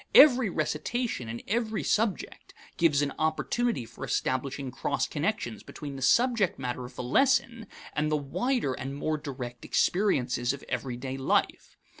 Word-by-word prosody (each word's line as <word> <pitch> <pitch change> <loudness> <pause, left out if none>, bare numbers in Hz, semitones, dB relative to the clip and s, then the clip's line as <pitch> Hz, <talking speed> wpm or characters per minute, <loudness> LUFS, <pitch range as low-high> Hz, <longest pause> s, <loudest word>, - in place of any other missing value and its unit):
Every 255 -7 +8
recitation 155 - -2
in 115 +1 -6
every 220 0 -1
subject 215 -2 -1 0.2
gives 150 -4 +3
an 140 - -2
opportunity 160 - 0
for - - -11
establishing 135 +1 -1
cross - - -1
connections - - -2
between 145 -2 -8
the 135 - -7
subject 230 - +3
matter 125 -1 -4
of 125 - -11
the - - -4
lesson 230 - +2 0.3
and 150 +1 0
the 155 - +3
wider 150 - -1
and 135 +2 -5
more 155 +2 -1
direct 125 -4 -7
experiences 125 -10 +1
of 140 - -8
everyday 130 +1 -3
life. 135 - 0
145 Hz, 145 wpm, -28 LUFS, -, 0.3 s, Every